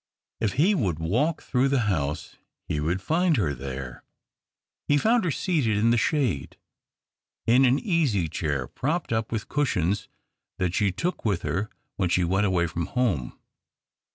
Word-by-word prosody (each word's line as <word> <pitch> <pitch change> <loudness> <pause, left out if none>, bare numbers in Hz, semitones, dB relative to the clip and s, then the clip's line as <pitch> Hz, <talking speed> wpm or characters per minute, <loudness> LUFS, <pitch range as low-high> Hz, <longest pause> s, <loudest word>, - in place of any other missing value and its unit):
If 110 -3 0
he 165 +11 +3
would 95 - 0
walk 120 - 0
through 130 +1 +1
the 135 -2 +2
house 75 -9 -2 0.3
he 75 - -1
would 85 +5 -1
find 165 -1 +2
her 85 -10 +1
there. 65 -1 -7 0.8
He 145 - +4
found 225 - +3
her - - +1
seated 140 - 0
in 115 +2 +3
the - - +4
shade, 120 - 0 0.9
in 125 +4 +5
an 130 +2 +4
easy 145 - +1
chair, 75 -4 -2
propped 150 - -2
up 110 0 -1
with 110 -2 -3
cushions 100 - 0 0.5
that 90 -2 -1
she 100 0 +2
took 170 - -3
with 100 -6 0
her 100 +5 -1 0.3
when 90 -3 +1
she 90 +1 +2
went 95 +4 +2
aw\ay 90 -2 +2
from 85 0 -3
home. 100 - -1
105 Hz, 160 wpm, -26 LUFS, 85-140 Hz, 0.9 s, in